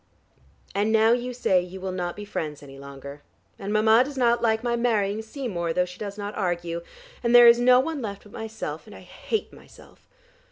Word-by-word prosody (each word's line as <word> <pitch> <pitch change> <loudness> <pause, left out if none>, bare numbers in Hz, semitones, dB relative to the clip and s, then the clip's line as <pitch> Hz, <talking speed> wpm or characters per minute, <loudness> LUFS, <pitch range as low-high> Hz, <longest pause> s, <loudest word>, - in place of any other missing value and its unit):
And 205 +2 +1
now 220 0 +4
you 245 +1 0
say 195 -7 +2
you 180 +2 -9
will 190 0 -4
not 175 -1 -3
be 205 - -8
friends 150 -7 -5
any 135 -1 -12
longer, 140 +1 -10 0.4
and 200 - -5
Mama 220 +3 +5
does 275 +1 -8
not 240 -2 +2
like 220 0 +1
my 240 -1 0
marrying 220 -3 0
Seymour, 220 - -4
though 180 +1 +1
she 180 0 -12
does 205 -1 -6
not 205 0 -5
argue, 175 -3 -2 0.4
and 235 0 +2
there 240 0 +10
is 235 0 +7
no 250 +1 +6
one 295 +1 -2
left 200 -3 -6
but 210 - -17
myself, 220 0 -6
and - - -12
I - - -12
hate 440 - -4
myself. - - -18
210 Hz, 205 wpm, -25 LUFS, 180-235 Hz, 0.4 s, there